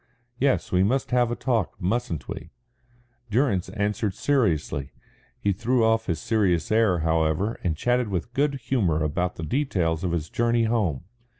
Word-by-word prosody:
"Yes, 135 Hz, 0 st, +1 dB
we 90 Hz, -, +3 dB
must 125 Hz, +7 st, +1 dB
have 125 Hz, -1 st, +3 dB
a 120 Hz, -, -1 dB
talk, 115 Hz, -8 st, -1 dB
mustn't 95 Hz, -, -2 dB
we?" -, -, -7 dB, 0.8 s
Durrance 105 Hz, -5 st, +1 dB
answered 105 Hz, -1 st, -1 dB
seriously. 80 Hz, -, 0 dB, 0.5 s
He 100 Hz, -, +1 dB
threw 120 Hz, +4 st, +1 dB
off 115 Hz, 0 st, +2 dB
his 85 Hz, -3 st, -1 dB
serious 95 Hz, -4 st, +1 dB
air, 110 Hz, -6 st, +3 dB
however, 80 Hz, +6 st, +1 dB
and 80 Hz, -4 st, 0 dB
chatted 125 Hz, +4 st, +1 dB
with 100 Hz, +4 st, -3 dB
good 140 Hz, +2 st, +1 dB
humour 110 Hz, -, 0 dB
about 90 Hz, +4 st, -1 dB
the 80 Hz, -, -6 dB
details 85 Hz, -, 0 dB
of 90 Hz, -, 0 dB
his 85 Hz, -2 st, -2 dB
journey 120 Hz, 0 st, +2 dB
home. 105 Hz, -, 0 dB
105 Hz, 160 wpm, -25 LUFS, 85-120 Hz, 0.8 s, we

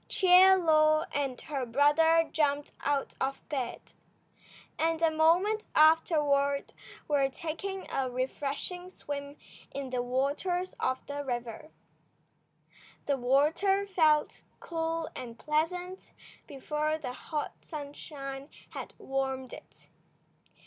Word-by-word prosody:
Chie 375 Hz, 0 st, +7 dB
Lo 310 Hz, -3 st, +4 dB
and 275 Hz, -3 st, -2 dB
her 280 Hz, -4 st, -3 dB
brother 295 Hz, +6 st, +4 dB
jumped 290 Hz, -2 st, 0 dB
out 285 Hz, -1 st, -1 dB
of 270 Hz, +1 st, -1 dB
bed, 265 Hz, -5 st, -4 dB, 0.9 s
and 325 Hz, 0 st, +1 dB
a 325 Hz, -1 st, +3 dB
moment 355 Hz, +8 st, +3 dB
afterward 295 Hz, -3 st, +3 dB, 0.3 s
were 280 Hz, -2 st, +2 dB
taking 360 Hz, +6 st, -5 dB
a 265 Hz, -1 st, -1 dB
refreshing 280 Hz, +8 st, -4 dB
swim 285 Hz, -4 st, -7 dB, 0.3 s
in 275 Hz, -2 st, -6 dB
the 250 Hz, -1 st, 0 dB
waters 285 Hz, +9 st, -1 dB
of 260 Hz, 0 st, -1 dB
the 285 Hz, 0 st, -4 dB
river. 240 Hz, +1 st, -5 dB, 1.4 s
The 280 Hz, -1 st, +1 dB
water 305 Hz, +11 st, +2 dB
felt 315 Hz, -6 st, +2 dB, 0.2 s
cool 325 Hz, -1 st, -2 dB
and 235 Hz, -2 st, -7 dB
pleasant 355 Hz, +6 st, -2 dB, 0.3 s
before 300 Hz, +2 st, -2 dB
the 260 Hz, -5 st, -5 dB
hot 300 Hz, +3 st, -4 dB
sunshine 280 Hz, -2 st, -7 dB, 0.2 s
had -, -, -8 dB
warmed 265 Hz, -1 st, -3 dB
it. -, -, -14 dB
295 Hz, 105 wpm, -30 LUFS, 275-330 Hz, 1.4 s, Chie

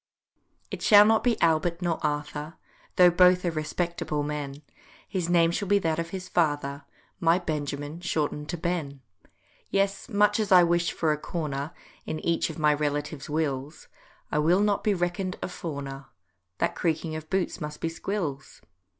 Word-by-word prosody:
It -, -, -5 dB
shall 205 Hz, -2 st, +8 dB
not 220 Hz, +1 st, +3 dB
be 245 Hz, -2 st, +1 dB
"Albert" 165 Hz, +1 st, +2 dB
nor 175 Hz, -2 st, -1 dB
"Arthur," 150 Hz, +1 st, -3 dB, 0.4 s
Though 180 Hz, -1 st, +7 dB
both 180 Hz, +1 st, +5 dB
are 175 Hz, -, +1 dB
respectable 155 Hz, -1 st, -2 dB
men, 145 Hz, -1 st, -5 dB, 0.4 s
His 180 Hz, -3 st, -2 dB
name 170 Hz, -1 st, +4 dB
shall 200 Hz, +3 st, -2 dB
be 200 Hz, +2 st, +4 dB
that 165 Hz, -4 st, 0 dB
of 165 Hz, 0 st, -3 dB
his 185 Hz, -1 st, -6 dB
father, 145 Hz, -5 st, 0 dB, 0.3 s
My 170 Hz, +1 st, +4 dB
Benjamin 150 Hz, -2 st, -4 dB
shorten'd 150 Hz, -4 st, -2 dB
to 175 Hz, -, -2 dB
"Ben." 160 Hz, -5 st, -3 dB, 0.7 s
Yes, 195 Hz, 0 st, 0 dB
much 210 Hz, 0 st, +3 dB
as 210 Hz, -3 st, -1 dB
I 180 Hz, -1 st, +8 dB
wish 170 Hz, 0 st, +2 dB
for 160 Hz, -2 st, 0 dB
a 150 Hz, -, -1 dB
corner 150 Hz, -3 st, -4 dB, 0.4 s
In 155 Hz, -, -3 dB
each 170 Hz, 0 st, 0 dB
of 160 Hz, -, -7 dB
my 150 Hz, -1 st, +4 dB
relative's 145 Hz, 0 st, -3 dB
wills, 150 Hz, -1 st, -3 dB, 0.4 s
I 150 Hz, -, +1 dB
will 170 Hz, +6 st, +3 dB
not 205 Hz, -1 st, +1 dB
be 210 Hz, -2 st, +2 dB
reckon'd 175 Hz, +1 st, -2 dB
a -, -, -1 dB
fawner— 140 Hz, -6 st, -6 dB, 0.5 s
That -, -, 0 dB
creaking 160 Hz, -1 st, -1 dB
of 155 Hz, 0 st, -7 dB
boots 190 Hz, -1 st, -1 dB
must 150 Hz, 0 st, -5 dB
be -, -, -1 dB
Squills. 165 Hz, -5 st, -4 dB
165 Hz, 165 wpm, -27 LUFS, 150-180 Hz, 0.7 s, shall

